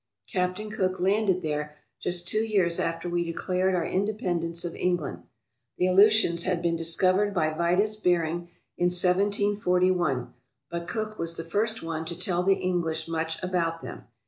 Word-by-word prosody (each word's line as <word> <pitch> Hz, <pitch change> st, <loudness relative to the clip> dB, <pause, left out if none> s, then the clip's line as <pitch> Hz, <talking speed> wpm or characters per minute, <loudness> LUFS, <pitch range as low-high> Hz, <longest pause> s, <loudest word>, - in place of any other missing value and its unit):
Captain 185 Hz, +4 st, -2 dB
Cook 185 Hz, -4 st, -1 dB
landed 190 Hz, -1 st, +2 dB
there 150 Hz, -1 st, -2 dB, 0.2 s
just 175 Hz, -1 st, -2 dB
two 215 Hz, +4 st, +2 dB
years 190 Hz, -6 st, +1 dB
after 165 Hz, +1 st, -2 dB
we 175 Hz, 0 st, 0 dB
declared 180 Hz, +2 st, 0 dB
our 170 Hz, -2 st, 0 dB
independence 180 Hz, -4 st, -1 dB
of 170 Hz, -, -4 dB
England. 175 Hz, -4 st, -1 dB, 0.6 s
The 180 Hz, -, +2 dB
Aleutians 190 Hz, -2 st, +5 dB
had 180 Hz, -1 st, 0 dB
been 170 Hz, -1 st, 0 dB
discovered 185 Hz, +5 st, +1 dB
by 155 Hz, -2 st, +1 dB
Vitus 180 Hz, +6 st, +2 dB
Bering 175 Hz, -3 st, 0 dB, 0.3 s
in 175 Hz, -, +3 dB
1741, 180 Hz, -, +1 dB, 0.4 s
but 170 Hz, 0 st, -4 dB
Cook 215 Hz, -1 st, -4 dB
was 165 Hz, 0 st, -3 dB
the 165 Hz, -, -4 dB
first 215 Hz, +6 st, -1 dB
one 165 Hz, -1 st, -3 dB
to 170 Hz, +1 st, -5 dB
tell 180 Hz, -1 st, 0 dB
the 195 Hz, +1 st, +4 dB
English 165 Hz, -4 st, -1 dB
much 160 Hz, 0 st, -2 dB
about 170 Hz, -3 st, -1 dB
them. -, -, -8 dB
180 Hz, 155 wpm, -27 LUFS, 165-190 Hz, 0.6 s, Aleutians